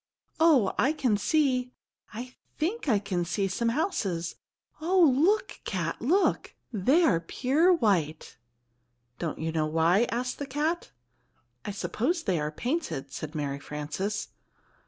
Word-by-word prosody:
"Oh, 295 -11 +5
I 280 +4 +3
can 255 -8 +1
see 255 +3 +1 0.4
I 245 +4 -7 0.2
think 340 +2 -1
I 220 - +4
can 195 -3 -2
see 175 +4 -1
some 230 +5 0
houses! 200 - -1 0.5
Oh, 340 -4 +4
look, 400 +9 +2
Cat, 170 -4 -3
look! 355 +11 +1 0.2
They 260 - +3
are 170 - +4
pure 280 - +2
white!" 180 - 0 0.8
"Don't 165 -3 -3
you 160 +1 -2
know 155 -1 0
why?" 165 +7 +3
asked 250 +2 -2
the 285 - -4
cat. 305 +5 -1 0.8
"I - - -3
suppose 220 - -1
they 185 -5 0
are 150 0 -1
painted," 160 - -3
said 155 +1 -6
Mary 140 -2 -2
Frances. 150 +9 -4
220 Hz, 135 wpm, -28 LUFS, -, 0.8 s, Oh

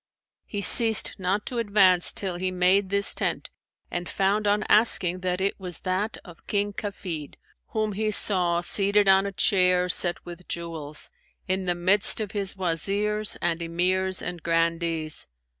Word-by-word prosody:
He 205 - -5
ceased 225 +1 +5
not 190 +3 -2
to 245 -3 -4
advance 195 -5 +3
till 185 -3 -4
he 185 +1 -2
made 185 +2 +2
this 200 0 +4
tent - - -3 0.4
and 175 0 -5
found 200 +2 0
on 205 +1 +1
asking 185 -5 +3
that 180 0 -2
it 195 +2 -2
was 180 -3 -4
that 195 +4 -3
of 175 -3 -16
King 205 0 -1
Kafid, 180 -8 -6 0.3
whom 215 -1 -2
he 215 +2 -2
saw 180 -5 +2
seated 200 +3 +2
on 195 +1 +4
a - - -5
chair 180 -2 +2
set 175 -1 +2
with 175 0 -11
jewels, 160 -3 -5 0.4
in 190 0 -2
the 175 -1 -1
midst 190 +5 +2
of 210 -2 -4
his 200 -3 -3
Wazirs 200 +4 -2
and 170 0 -1
Emirs 185 +3 -1
and 175 -2 -6
Grandees. 165 -1 -1
185 Hz, 160 wpm, -25 LUFS, 175-205 Hz, 0.4 s, ceased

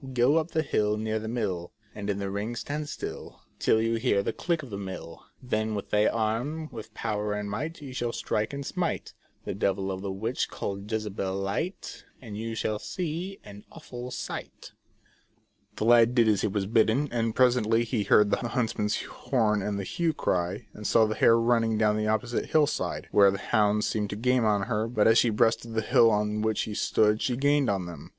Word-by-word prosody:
Go 125 +6 +4
up 160 +1 0
the 160 -1 0
hill 105 -6 +1
near 110 0 -1
the 110 - -6
mill, 100 -7 -3 0.2
And 105 -1 -5
in 100 - 0
the 100 -1 -3
ring 105 +4 -3
stand 150 +5 -4
still - - -7 0.2
Till 110 - +3
you 115 +1 +1
hear 110 -4 +1
the - - -2
click 170 -3 -1
of 130 - -10
the 100 - -4
mill 95 -4 -8 0.2
Then 110 -3 -1
with 100 - -6
thy 105 0 +4
arm, 120 +8 -1
with 110 0 -9
power 105 -2 -2
and 105 0 -3
might, 150 +10 -4
You 135 -2 -8
shall 120 -2 -2
strike 110 -1 -2
and 140 0 -5
smite 175 +3 -3 0.3
The - - -3
devil 95 0 -1
of 95 0 -5
a 100 - -3
witch 110 +6 -2
called 100 0 -5
Jezabel 105 -3 -2
light, 100 - -4 0.2
And 110 -5 -9
you 115 +1 -4
shall 110 -1 -1
see 180 - -4
an 105 0 -12
aivful 125 -5 -8
sight" - - -7 1.0
The 110 - -2
lad 120 +1 +5
did 115 -3 +5
as 105 -3 +3
he - - +1
was 100 -1 -1
bidden, 115 +6 +2
and 115 -2 -1
presently 120 -3 +3
he 115 -2 -1
heard 105 -1 +5
the - - +3
huntsman's 115 -3 -1
horn 110 -5 0
and 100 0 -2
the 100 - -3
hue 170 - -2
and 160 - 0
cry, 90 +2 -1
and 105 - -5
saw 115 -1 +5
the 110 - -1
hare 115 +1 +5
running 115 -1 +2
down 105 -1 +3
the 105 0 -1
opposite 115 +2 -1
hill 155 -1 +4
side, - - -3
where 100 -1 +6
the 100 - -1
hounds 105 0 +1
seemed 105 -2 -1
to - - -4
gain 125 +2 +2
on 105 -2 +2
her, 110 0 -1
but 115 -3 +2
as 115 +1 +6
she 120 - +3
breasted 115 +1 +1
the 110 - +2
hill 115 +1 +5
on 105 0 0
which 110 0 0
he 105 - -5
stood 105 +1 +2
she 125 -2 0
gained 145 -1 +2
on 95 -3 -1
them. 85 -1 -9
110 Hz, 215 wpm, -27 LUFS, 105-120 Hz, 1.0 s, where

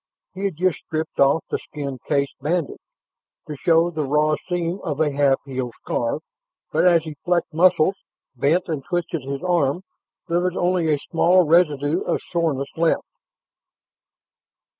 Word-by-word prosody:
He 195 +2 -4
had 195 -5 -1
just 180 -1 0
stripped 160 0 -5
off 140 +4 +4
the - - 0
skin 140 -3 -6
case 140 -2 0
bandage, 160 +1 -1 0.7
to 150 - -5
show 165 +3 +3
the 155 -2 -2
raw 150 +2 +2
seam 175 0 -2
of 150 -4 -3
a 155 -2 +2
half 140 -1 +2
healed 130 -3 -4
scar, 120 +5 -1 0.5
but - - +3
as 170 -2 +4
he 155 -1 -6
flexed 175 -2 0
muscles, 180 +2 +4 0.4
bent 160 +9 +1
and 155 -5 -3
twisted 175 0 -2
his 135 +3 -5
arm, 175 -2 +1 0.4
there 170 +1 +1
was 180 0 -1
only 175 -3 +1
a 150 - +3
small 175 +4 +3
residue 155 -1 +3
of - - -1
soreness 155 -6 0
left. 165 0 +1
160 Hz, 155 wpm, -22 LUFS, 145-175 Hz, 0.7 s, off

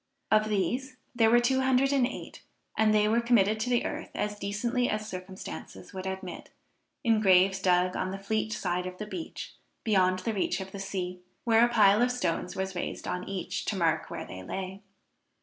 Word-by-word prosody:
Of 215 0 +4
these 245 +7 -1 0.2
there 225 -2 +4
were 240 +1 +6
two 260 +2 +2
hundred 265 +1 +3
and 260 -3 +3
eight, - - -8 0.3
and 220 0 +4
they 210 0 +4
were 230 +2 +3
committed 220 -3 +3
to 235 +3 -1
the 245 -1 +2
earth - - -4
as 210 0 -2
decently 235 +5 0
as 215 0 -2
circumstances 180 - -8
would 190 0 -5
admit, 190 -2 -6 0.5
in 225 -2 +3
graves 190 -1 +5
dug 180 -1 +2
on 185 - -1
the 195 - -4
Fleet 215 +2 -1
side 180 -2 -1
of 185 0 -7
the 210 - -5
beach, 325 +10 -6 0.3
beyond 185 -4 +3
the 200 +5 -2
reach 190 -2 0
of 190 0 -7
the 200 - -7
sea, 185 -2 -4 0.2
where 230 -1 +5
a 240 - +4
pile 210 -2 +5
of 245 +1 +3
stones 180 -8 -2
was 190 0 -2
raised 175 - -4
on 180 +1 -3
each, 195 -2 -3
to 210 - -1
mark 165 -4 +1
where - - -5
they 95 - -8
lay. 190 - -5
200 Hz, 200 wpm, -29 LUFS, 185-230 Hz, 0.5 s, were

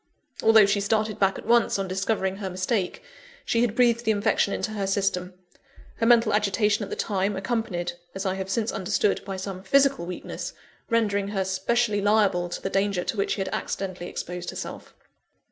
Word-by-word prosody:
Although 220 -2 +7
she 200 +1 +1
started 215 +1 0
back 195 -1 +2
at - - -9
once, 235 -1 +3
on 195 -1 -2
discovering 190 0 -1
her 195 -2 -4
mistake, 185 - -2 0.4
she 230 - +1
had 235 -3 +1
breathed 235 -1 +3
the 220 - -1
infection 205 -1 +2
into 215 - -2
her 200 -2 -2
system 190 -2 -1 0.6
her 230 - +1
mental 230 -2 +5
agitation 210 +1 +2
at 205 - -4
the - - -3
time, 200 0 -1
accompanied 190 -4 -2 0.2
(as 195 +1 -4
I 190 - +1
have 190 0 -5
since 220 +3 0
understood) 200 +1 0
by 195 -1 -4
some 190 0 -5
physical 275 -1 +3
weakness, 180 - -6 0.4
rendering 205 -3 +1
her 195 -2 -1
specially 205 +3 +1
liable 200 -4 +2
to - - -6
the - - -1
danger 195 -2 +1
to - - -3
which 200 - 0
she 200 - -3
had 190 - -2
accidentally 185 -2 -4
exposed 180 0 -5
herself. - - -7
200 Hz, 185 wpm, -25 LUFS, 190-220 Hz, 0.6 s, Although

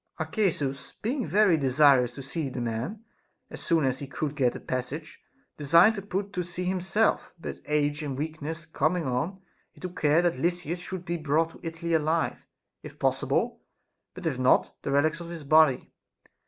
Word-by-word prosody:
Arcesus, 145 - -1
being 250 +3 -1
very 200 -4 +4
desirous 135 -2 +4
to 135 - -8
see 140 +1 -3
the 130 - -5
man, 120 - -3 0.5
as - - -8
soon 165 -4 +2
as 130 0 0
he 140 - -6
could 145 +2 -3
get 130 -4 +1
a - - -5
passage, 140 +5 -5 0.4
designed 170 +9 +6
to 205 - -5
put 200 0 -4
to 180 -2 -1
sea 175 +1 -5
himself; 190 +4 +1
but - - -6
age 150 0 +1
and 140 -3 -4
weakness 155 +1 -5
coming 155 +2 0
on, 155 +10 -2 0.3
he - - -20
took 180 -1 -7
care 155 +3 +4
that 170 -7 +1
Lysis 175 +1 -1
should 180 0 -6
be 170 +1 -2
brought 160 +1 +1
to - - -15
Italy 165 0 -4
alive, 160 +1 0 0.3
if - - -11
possible; - - 0 0.5
but - - -9
if 140 -6 -1
not, 130 0 +3
the - - -4
relics 150 +3 +2
of 170 -1 -8
his 170 -3 -7
body. 155 -2 +4
160 Hz, 180 wpm, -27 LUFS, 140-175 Hz, 0.5 s, designed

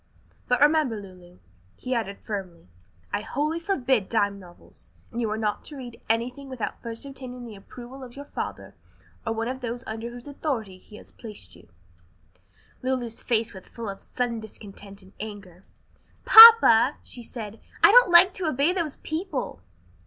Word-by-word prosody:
But 250 - +1
remember, 295 -7 +3
Lulu," 180 -2 -14 0.4
he 255 - -5
added 215 -5 -3
firmly, 190 - -7 0.5
"I - - -1
wholly 300 +8 -2
forbid 265 - 0
dime 205 -3 0
novels, 175 -2 -13 0.2
and 235 - -4
you 225 - -1
are 215 - -2
not 210 -2 -2
to 295 - -8
read 245 -3 -10
anything 245 +5 -2
without 255 -4 -5
first 230 +2 -6
obtaining 255 -3 -9
the 225 -3 -10
approval 245 +6 -12
of 245 -2 -12
your 285 +1 -9
father 100 - -7 0.5
or - - 0
one 225 +1 -3
of 260 +1 -5
those 240 +1 -5
under 225 +2 -6
whose 240 0 -11
authority 240 -10 -4
he 210 - -16
has - - -14
placed 210 - -11
you." - - -19 1.1
Lulu's 250 -3 -3
face 230 -1 -1
was 190 -2 -12
full 230 -2 -8
of 195 - -8
sullen 240 -2 -3
discontent 200 -2 -11
and 190 +1 -19
anger. 200 -4 -9 0.6
"Papa," 445 - +9
she 245 - -6
said, 225 -2 -8 0.2
"I - - +9
don't - - +7
like 355 +2 +7
to 370 -4 -3
obey 300 +4 +1
those 335 -6 -3
people." 315 - -4
235 Hz, 165 wpm, -25 LUFS, 210-270 Hz, 1.1 s, Papa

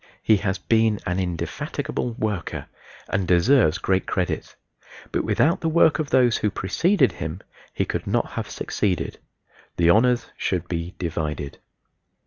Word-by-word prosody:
He 110 - +5
has 95 -1 -1
been 110 -1 +2
an 90 +1 -1
indefatigable 90 +6 -3
worker 105 -5 -3 0.4
and 95 - 0
deserves 90 - +4
great 95 0 0
credit; 90 -2 -2 0.6
but - - 0
without 165 +3 +2
the 165 - +1
work 160 -1 +4
of 150 -2 -2
those 125 -3 +4
who 105 - 0
preceded 160 - +2
him 80 +3 -6 0.3
he - - -1
could - - -4
not - - 0
have - - -4
succeeded: 95 -4 -2 0.6
the 85 0 +5
honors 120 +3 +3
should 90 -2 -2
be 85 +1 -4
divided. 75 -4 -4
95 Hz, 140 wpm, -23 LUFS, 85-120 Hz, 0.6 s, He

